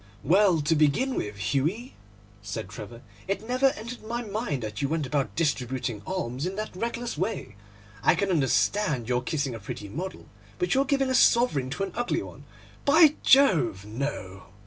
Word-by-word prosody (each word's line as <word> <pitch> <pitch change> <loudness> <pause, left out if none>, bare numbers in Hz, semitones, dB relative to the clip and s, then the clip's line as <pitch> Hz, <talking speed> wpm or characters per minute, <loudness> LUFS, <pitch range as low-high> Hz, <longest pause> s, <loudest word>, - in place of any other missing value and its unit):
'Well, 185 -2 +4
to 155 +3 +2
begin 155 - +2
with, 105 - -3
Hughie,' 145 - -1 0.5
said 100 -2 -5
Trevor, 115 +4 -9 0.2
'it 200 +3 -3
never 255 +2 +3
entered 235 +3 -7
my 235 +2 -3
mind 205 - -3
that 105 +3 -5
you 140 - 0
went 160 -2 -1
about 140 0 -1
distributing 130 -7 -1
alms 145 -5 -2
in 190 - -4
that 215 -2 -5
reckless 235 -2 -3
way. 185 - -3 0.5
I 165 - +4
can 195 +2 0
understand 150 - +1
your 125 0 +1
kissing 140 -1 -2
a 115 - -6
pretty 100 0 -7
model, 180 - -6 0.3
but 360 - 0
your 270 +1 +3
giving 270 -1 +1
a - - +1
sovereign 235 - +4
to 170 +8 -3
an 195 - -3
ugly 240 +1 -1
one—by 305 +1 +1
Jove, 165 - +4
no! 105 -5 -5
165 Hz, 170 wpm, -27 LUFS, -, 0.5 s, Well